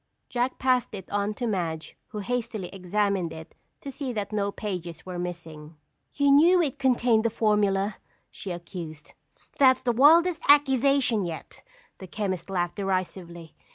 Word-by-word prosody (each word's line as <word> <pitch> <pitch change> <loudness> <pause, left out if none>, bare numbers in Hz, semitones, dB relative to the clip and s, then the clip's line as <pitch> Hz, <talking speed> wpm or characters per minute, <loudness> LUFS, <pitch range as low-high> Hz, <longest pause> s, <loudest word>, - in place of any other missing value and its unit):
Jack 245 +1 -1
passed 255 -3 +1
it 190 -2 -9
on 205 +1 -1
to 245 - -3
Madge 170 -7 -3
who - - -9
hastily 220 -4 -3
examined 195 -1 -1
it 160 0 -10 0.3
to 275 - -6
see 270 -1 -5
that 210 -2 -4
no 200 -1 -1
pages 175 -6 -6
were 180 -1 -6
missing. 165 -3 -7 0.4
"You 285 -1 +3
knew 335 +6 +6
it 295 -4 -1
contained 245 -4 +3
the 230 - +2
formula," 210 -2 +1 0.3
she 200 - -8
accused. 170 -3 -8 0.5
"That's 260 -2 +5
the 245 - +2
wildest 320 +7 +5
accusation 275 -5 +4
yet!" 165 -2 -7 0.4
the 190 - -9
chemist 190 -2 -4
laughed 175 -1 -2
derisively. 185 -4 -4
205 Hz, 150 wpm, -26 LUFS, 180-250 Hz, 0.5 s, knew